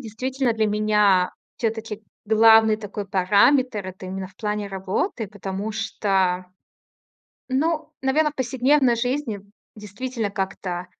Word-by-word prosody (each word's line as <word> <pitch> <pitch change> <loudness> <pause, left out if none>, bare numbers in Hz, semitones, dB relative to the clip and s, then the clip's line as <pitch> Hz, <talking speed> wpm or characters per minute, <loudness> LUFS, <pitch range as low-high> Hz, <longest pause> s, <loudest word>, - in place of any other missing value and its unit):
действительно 255 +2 -2
для 220 -1 +1
меня 210 -3 +3 0.3
всё-таки 220 -2 -3 0.2
главный 220 0 +6
такой 205 -1 -6
параметр- 205 +4 +3
это 185 0 -8
именно 190 0 -5
в 195 - -19
плане 210 -1 -2
работы, 195 - -2
потому 200 +1 -5
что 190 -4 0 1.0
Ну, 310 +3 -1
наверно, 300 +3 +2
в - - -19
повседневной 260 0 +2
жизни 245 -3 -2 0.4
действительно 215 +1 -4
как-то 190 -3 -4
215 Hz, 115 wpm, -23 LUFS, 195-255 Hz, 1.0 s, главный